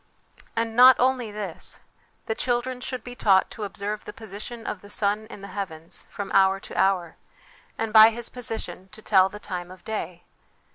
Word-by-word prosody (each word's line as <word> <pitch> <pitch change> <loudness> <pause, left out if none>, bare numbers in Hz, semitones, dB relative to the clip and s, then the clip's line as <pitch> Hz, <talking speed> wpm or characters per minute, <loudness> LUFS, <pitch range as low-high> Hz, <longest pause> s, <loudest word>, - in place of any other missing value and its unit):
And 225 0 -1
not 255 +1 +9
only 255 -2 +2
this: 205 -5 -6 0.5
the 220 - -1
children 250 +2 -1
should 255 -2 -5
be 245 - -8
taught 195 -5 +3
to 215 - -5
observe 205 +1 -4
the - - -8
position 220 +2 -8
of 190 - -4
the 205 - -14
sun 205 +1 0
in 210 - -11
the - - -6
heavens 170 -5 -7
from 200 -1 -6
hour 195 0 +4
to - - -11
hour, 185 -4 +1 0.6
and 225 -1 -3
by 220 0 +10
his 235 +1 -3
position, 225 -7 -6
to 215 0 -11
tell 190 -2 +5
the 210 - -9
time 180 -3 -6
of 185 0 -14
day. 180 -5 -5
210 Hz, 185 wpm, -25 LUFS, 190-230 Hz, 0.6 s, by